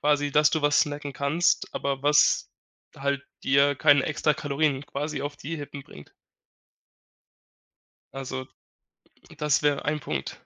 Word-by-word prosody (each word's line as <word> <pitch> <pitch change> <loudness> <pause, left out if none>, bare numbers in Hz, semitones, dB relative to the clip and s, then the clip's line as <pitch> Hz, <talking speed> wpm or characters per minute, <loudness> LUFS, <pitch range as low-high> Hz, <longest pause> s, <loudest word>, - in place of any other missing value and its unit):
quasi 145 -1 +1
dass 150 +1 +4
du 160 - 0
was 145 0 +3
snacken 145 -2 -3
kannst, 150 +5 0
aber 140 -1 -2
was 150 +1 +3 0.4
halt, 140 0 -2 0.2
dir 140 +1 +3
keine 145 -1 +4
extra 150 -1 0
Kalorien 145 -1 -1
quasi 150 +2 -4
auf 145 0 -5
die 160 +4 -6
Rippen 145 -1 -8
bringt. 75 - -15 2.0
Also, 130 -1 -5 0.9
das 150 -1 +1
wäre 145 -1 +1
ein 150 0 -1
Punkt. 70 - -5
145 Hz, 130 wpm, -26 LUFS, 140-150 Hz, 2.0 s, dass